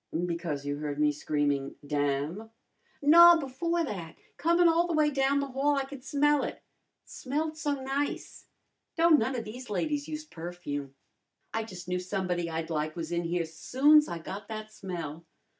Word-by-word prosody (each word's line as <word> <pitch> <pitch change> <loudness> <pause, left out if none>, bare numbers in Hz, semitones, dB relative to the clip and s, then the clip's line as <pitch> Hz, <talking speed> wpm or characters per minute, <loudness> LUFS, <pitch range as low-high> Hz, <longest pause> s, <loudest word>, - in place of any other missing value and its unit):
"Because 170 -5 -3
you 145 0 -2
heard 145 -1 -4
me 150 0 +4
screaming 145 -2 -1
'damn'?" 145 +8 -1 0.5
"No, 340 +3 +9
before 330 +4 -1
that. 175 - -5 0.2
Comin' 340 +2 +3
all 335 +1 +3
the 340 - -1
way 305 -1 +3
down 275 0 +2
the 280 -1 -2
hall 275 +3 +1
I 275 -1 0
could 270 -1 -10
smell 295 +1 +2
it. - - -5 0.4
Smelled 310 +4 -3
so 290 -2 -2
nice. 275 +2 -3 0.5
Don't 330 -2 +6
none 255 +4 -1
of 230 - -3
these 245 +3 -8
ladies 285 - -1
use 305 0 -5
perfume. 160 - -6 0.6
I 225 0 -1
jus' 180 -5 -9
knew 180 0 -1
somebody 180 -2 -2
I'd 165 0 -4
like 155 0 -2
was 165 -1 -5
in 170 0 -1
here 170 0 0
soon's 285 - +4
I 170 - -4
got 195 +5 -7
that 215 -1 -7
smell." 170 -5 -6
215 Hz, 170 wpm, -29 LUFS, -, 0.6 s, No